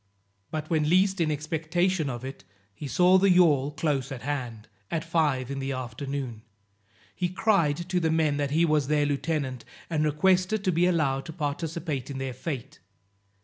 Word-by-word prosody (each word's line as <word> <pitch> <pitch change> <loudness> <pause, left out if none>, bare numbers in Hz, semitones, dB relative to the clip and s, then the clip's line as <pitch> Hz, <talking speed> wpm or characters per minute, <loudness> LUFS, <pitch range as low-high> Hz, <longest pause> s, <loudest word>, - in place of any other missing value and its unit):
But 155 0 -4
when 155 -2 +1
least 190 +1 +3
in 160 - +2
expectation 160 +2 0
of 120 0 -5
it, 135 -7 -8 0.3
he 140 +8 -7
saw 180 +6 +5
the 195 +1 +4
yawl 155 -7 +4
close 150 -3 -1
at 130 -3 -6
hand, 125 -6 -4 0.2
at 160 -2 -2
five 150 -6 0
in 140 - -3
the 135 0 -2
afternoon. 130 -1 -5 0.7
He 180 -1 -1
cried 175 -5 +1
to 180 -1 +1
the 165 -2 +1
men 155 -3 +2
that 145 -1 0
he 160 +4 +3
was 150 -4 +2
their 150 0 +2
lieutenant, 145 -3 -2 0.3
and 155 -2 +1
requested 185 +7 +2
to 185 - +2
be 175 +1 +3
allowed 145 -6 +1
to 160 - -7
participate 155 -2 -3
in 140 - -5
their 135 -1 -3
fate. 135 +1 -6
150 Hz, 175 wpm, -27 LUFS, 135-170 Hz, 0.7 s, saw